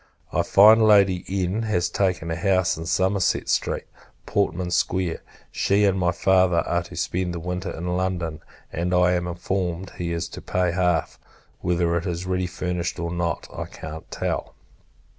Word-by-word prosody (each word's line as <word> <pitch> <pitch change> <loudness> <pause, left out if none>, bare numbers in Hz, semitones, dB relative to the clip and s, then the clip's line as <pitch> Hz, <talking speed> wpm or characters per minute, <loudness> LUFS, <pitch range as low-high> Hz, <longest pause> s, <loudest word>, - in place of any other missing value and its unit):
I - - +3
find 110 +3 +7
Lady 100 -4 +5
N. 95 +2 -1
has 95 -6 0
taken 90 -3 -1
a - - -1
house 95 +1 +2
in 80 +1 -7
Somerset 95 +2 +1
Street, - - 0 0.4
Portman 90 -3 -1
Square. 90 -1 0 0.3
She, 100 +1 +2
and 95 -1 +2
my 90 -1 +2
Father, 90 -1 +3
are - - 0
to - - -11
spend 90 -1 -2
the - - -4
winter 90 +2 -4
in 80 - -6
London; 90 -4 -2 0.3
and, 90 +2 0
I 90 0 +4
am 90 -1 0
informed, 90 +1 -3
he 85 -1 -2
is 85 0 -2
to - - -9
pay 90 -1 0
half. 90 -3 0 0.4
Whether 85 -1 +1
it 85 - -3
is 90 0 -3
ready 90 0 -1
furnished, 90 -1 -3
or 85 -1 -3
not, 85 -2 -2
I - - -4
can't 80 0 -9
tell. - - -3
90 Hz, 170 wpm, -24 LUFS, 85-95 Hz, 0.4 s, find